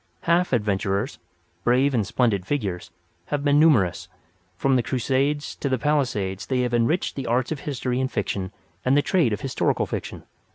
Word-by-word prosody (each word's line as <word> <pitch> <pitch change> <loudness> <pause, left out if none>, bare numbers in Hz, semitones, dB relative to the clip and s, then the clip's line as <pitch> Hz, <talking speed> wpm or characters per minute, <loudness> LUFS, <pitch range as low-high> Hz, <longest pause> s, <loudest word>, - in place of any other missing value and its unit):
Half 170 +2 +2
adventurers—brave 110 +5 -1
and 110 -6 +1
splendid 110 -7 +1
figures—have 140 +4 -4
been 145 0 +4
numerous. 130 - +3 0.5
From 135 -1 +2
the 125 - +3
Crusades 135 +4 -1
to 140 - -2
the 130 - +1
Palisades 115 -10 -1
they 130 -2 +1
have 125 -1 -1
enriched 120 +10 +1
the 135 -3 -4
arts 125 +4 0
of 155 - -2
history 130 -3 -2
and 130 - -1
fiction 100 -3 -2 0.3
and 130 +2 +3
the 145 - +3
trade 170 -11 +2
of 105 0 -2
historical 135 -2 0
fiction. - - -6
130 Hz, 160 wpm, -24 LUFS, 105-145 Hz, 0.5 s, been